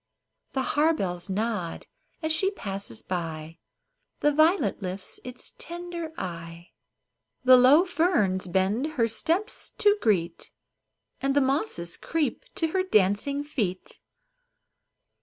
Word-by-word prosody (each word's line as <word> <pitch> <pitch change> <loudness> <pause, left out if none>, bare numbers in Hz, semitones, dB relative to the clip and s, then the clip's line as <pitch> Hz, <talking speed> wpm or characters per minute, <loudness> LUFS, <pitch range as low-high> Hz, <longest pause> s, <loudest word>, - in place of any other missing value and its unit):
The 265 - 0
harebells 195 - +1
nod 205 -3 -2 0.4
as 315 - 0
she 380 +5 +2
passes 195 - -5
by, 165 -2 -4 0.6
The 295 0 +3
violet 310 - +3
lifts 185 0 -6
its 250 0 -8
tender 345 -1 -6
eye, 170 -1 -7 0.7
The 255 0 +8
low 265 +8 +7
ferns 240 - +1
bend 200 - 0
her 230 -5 +2
steps 335 - -1
to 410 0 +5
greet, 170 -6 0 0.7
And 275 0 +1
the - - +6
mosses 265 - -1
creep 325 - -2
to 325 - 0
her 375 +3 +1
dancing 280 - +2
feet. 210 -11 -3
250 Hz, 115 wpm, -27 LUFS, -, 0.7 s, The